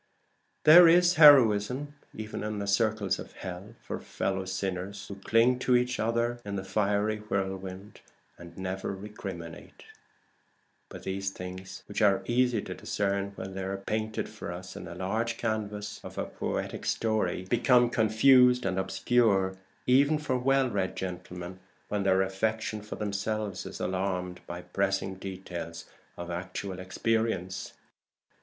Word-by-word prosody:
There 170 +3 +10
is 175 +1 +6
heroism 140 - +6 0.2
even 110 0 -5
in 105 0 -3
the 100 - -3
circles 105 -1 +1
of - - -9
hell 95 +4 -8
for - - -5
fellow 95 0 -2
sinners 95 +1 -4
who - - -6
cling 115 +5 +3
to 125 0 +3
each 125 0 +1
other 115 +2 0
in 100 -1 -5
the 95 - -3
fiery 105 +2 0
whirlwind 95 -1 -4 0.3
and 85 -1 -13
never 95 +1 -3
recriminate. 95 -5 -8 1.1
But - - -10
these 95 0 -2
things, 95 0 -8
which 100 - -3
are 100 -2 +4
easy 120 -3 +2
to - - -5
discern 100 0 -2
when 95 0 -6
they 95 - -4
are 95 +1 -3
painted 110 +2 -3
for - - -7
us 90 +1 -8
on - - -7
the 85 - -8
large 110 +5 -2
canvas 105 -2 -3
of - - -9 0.2
poetic - - -3
story, 105 -5 0
become 120 +4 +4
confused 125 +2 +5
and 95 0 0
obscure 95 -1 +2 0.3
even 140 +4 +4
for 150 -4 -1
well 135 +1 +2
read 95 -5 -2
gentlemen 90 0 -6 0.3
when 105 -1 -1
their 95 -1 +3
affection 110 +3 -2
for 105 - -7
themselves 105 -1 -3
is - - -8
alarmed 90 -1 -2
by 85 +1 -6
pressing 95 +1 -1
details 90 -3 -7 0.3
of 85 0 -6
actual 95 +2 -5
experience. 95 0 -1
100 Hz, 140 wpm, -29 LUFS, 95-115 Hz, 1.1 s, There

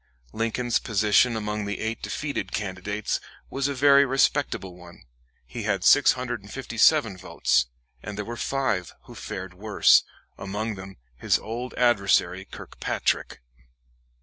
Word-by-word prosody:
Lincoln's 115 +2 0
position 110 +3 +2
among 105 -1 -3
the 100 0 -4
eight 110 +1 -3
defeated 140 -10 -4
candidates 100 +1 -3 0.3
was 135 +1 -1
a 140 - -3
very 140 +1 +6
respectable 135 -8 0
one. 90 -1 -15 0.4
He 60 - -7
had - - -1
657 120 0 +3
votes, 90 -8 +1 0.3
and 105 -1 -7
there 105 - -3
were 120 - -6
five 120 -8 -2
who - - -13
fared 95 -1 -7
worse, 105 +3 +4 0.4
among 105 +3 -3
them 95 0 -10 0.2
his - - +2
old 120 +3 -6
adversary 100 -6 +2
Kirkpatrick. - - -3
110 Hz, 120 wpm, -25 LUFS, 95-125 Hz, 0.4 s, very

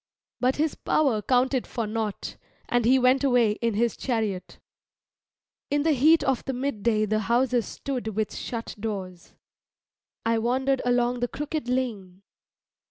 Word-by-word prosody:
But 255 +1 +2
his 310 0 0
power 265 -9 +1
counted 255 +2 +1
for 230 -3 -3
nought, 215 -1 -3 0.3
and 245 -1 +1
he 255 +3 +5
went 260 +2 +3
away 245 -5 +4
in 230 -3 0
his 235 +2 +1
chariot. 220 -7 -3 1.1
In 290 0 +1
the 320 - +3
heat 310 +4 +5
of 265 -2 0
the 265 - -2
midday 235 -4 0
the 215 +1 0
houses 240 +2 +1
stood 260 -5 -4
with 215 -1 -1
shut 230 -1 -5
doors. 190 -5 -6 0.9
I 230 0 +2
wandered 260 +3 +1
along 245 0 +1
the 245 - 0
crooked 295 0 -4
lane. 205 -8 -3
245 Hz, 145 wpm, -26 LUFS, 220-265 Hz, 1.1 s, he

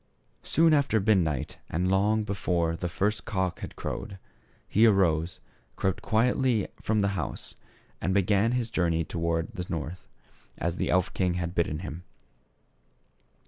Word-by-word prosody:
Soon 165 0 +3
after 140 -7 +3
midnight 90 - +1
and 90 +3 0
long 105 +3 +3
before 85 -5 0
the 90 +1 -3
first 105 +5 0
cock 95 -5 -2
had - - -7
crowed, 100 -1 -5 0.5
he 110 +3 +5
arose, 85 -5 +2 0.4
crept 95 -1 -1
quietly 120 -1 +2
from 110 -1 +1
the 100 - +2
house, 100 -2 -4 0.5
and 95 - 0
began 100 +4 +3
his 120 -2 -1
journey 85 -2 +1
towards 85 0 -2
the 90 -1 -5
North, 85 +2 -5 0.5
as 85 +1 -2
the - - -1
elf 90 0 +2
king 90 -2 0
had 90 -1 -2
bidden 80 -3 0
him. 90 -1 -7
95 Hz, 145 wpm, -28 LUFS, 85-110 Hz, 0.5 s, he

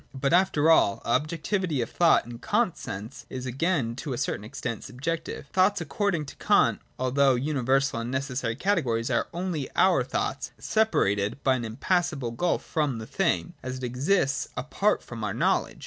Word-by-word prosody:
But 140 +3 0
after 170 -4 +4
all, 100 -10 +4
objectivity 155 - 0
of 115 - -2
thought, 170 -2 +4
in 120 0 -9
Kant's 210 - 0
sense, 105 +8 -7
is 130 -1 -5
again 130 -2 0
to 140 -1 -4
a - - -3
certain 105 - -2
extent 115 +1 -5
subjective. 165 +7 -4
Thoughts, 190 +2 +3
according 170 0 -1
to 135 - -10
Kant, - - +3 0.2
although 130 +1 +3
universal 135 -1 +1
and 115 +1 -4
necessary 130 -3 -2
categories, 130 - 0
are 120 - +1
only 170 -5 -3
our - - +4
thoughts - - -3
— - - -40 0.2
separated 115 - +1
by 135 - +4
an 120 -2 -3
impassable 140 +2 -1
gulf 170 +10 -1
from 150 -7 -1
the 110 - -6
thing, 175 - 0
as 130 0 -5
it 130 - -9
exists 135 +3 +1
apart - - 0
from - - -7
our - - -2
knowledge. - - +1
135 Hz, 170 wpm, -27 LUFS, 120-170 Hz, 0.2 s, after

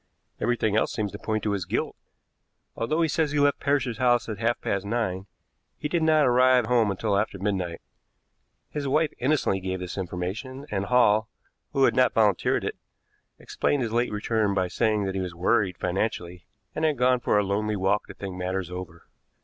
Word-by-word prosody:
Everything 115 -3 +1
else 110 - +2
seems 105 -2 -2
to 105 - -8
point 110 -2 -2
to 105 - 0
his 100 -4 -2
guilt. - - -2 0.8
Although 155 +9 0
he - - +3
says 160 0 +1
he 150 - +1
left 145 -1 +3
Parrish's 135 -4 0
house 120 -1 +3
at 110 -2 -5
half 120 +1 0
past 100 -1 -2
nine, 100 -3 -2 0.5
he 150 - -3
did 170 +2 0
not 155 -2 +4
arrive 125 0 +4
home 115 -2 +3
until 100 +1 -1
after 100 0 0
midnight. 95 -3 -2 0.9
His 145 -2 -3
wife 155 +3 +1
innocently 130 -7 +1
gave 95 0 -3
this 90 +1 -5
information, 95 +10 -5
and 100 -1 -1
Hall, 110 -2 +3 0.4
who 135 -2 +2
had - - +4
not 130 0 +4
volunteered 105 -4 +2
it, - - -3 0.6
explained 145 -3 -1
his 115 - -3
late 120 +1 +1
return 105 -1 0
by 95 -2 0
saying 110 +1 +1
that 95 - -2
he 95 - -2
was 90 -2 -5
worried 90 0 +1
financially, 90 -2 -3 0.3
and 155 - -3
had 155 -3 +2
gone 125 +1 +3
for 120 - +1
a 105 - +3
lonely 105 +2 -1
walk 100 +2 0
to - - -10
think 95 -2 -6
matters 90 0 -3
over. 90 -2 -8
110 Hz, 190 wpm, -26 LUFS, 95-125 Hz, 0.9 s, not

